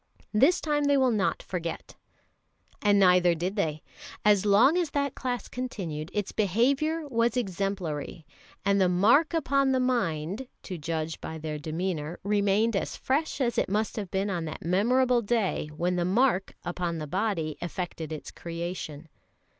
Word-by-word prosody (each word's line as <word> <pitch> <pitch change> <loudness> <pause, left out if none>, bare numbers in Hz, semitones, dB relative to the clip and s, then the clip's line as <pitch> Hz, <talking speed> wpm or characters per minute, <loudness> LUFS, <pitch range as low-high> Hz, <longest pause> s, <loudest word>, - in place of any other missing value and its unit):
This 275 +12 +4
time 295 -2 +1
they 285 0 +4
will 260 -2 +3
not 205 -4 0
forget." 170 -3 -5 0.9
And 205 -1 +4
neither 180 -2 +5
did 180 +5 -2
they. 155 -7 -1 0.4
As 210 -1 +4
long 230 +10 +6
as 350 -3 +1
that 280 -2 -1
class 250 -2 -3
continued, 175 -11 -5
its 205 -2 -2
behaviour 275 - +1
was 235 -1 +1
exemplary; 185 -7 -3 0.4
and 200 0 +3
"the 185 - +4
mark 220 - +4
upon 275 -3 +2
the 260 - +2
mind," 225 -3 -1 0.2
to 185 -4 -6
judge 160 +1 -3
by 160 - -6
their 155 -1 -5
demeanour, 160 +1 -3
remained 205 +2 +2
as 195 - -2
fresh 295 +5 -1
as 240 -3 +1
it - - 0
must 210 +2 0
have 205 -4 -4
been 195 +2 -1
on 170 -3 -2
that 155 - -7
memorable 240 +7 +3
day 210 -8 0
when 180 +2 0
the 175 - +1
"mark" 195 +1 +2
upon 175 -1 -2
the 155 - -4
body 165 -2 -1
effected 175 -3 -5
its 155 - -6
creation. 170 -2 -6
195 Hz, 160 wpm, -28 LUFS, 170-245 Hz, 0.9 s, long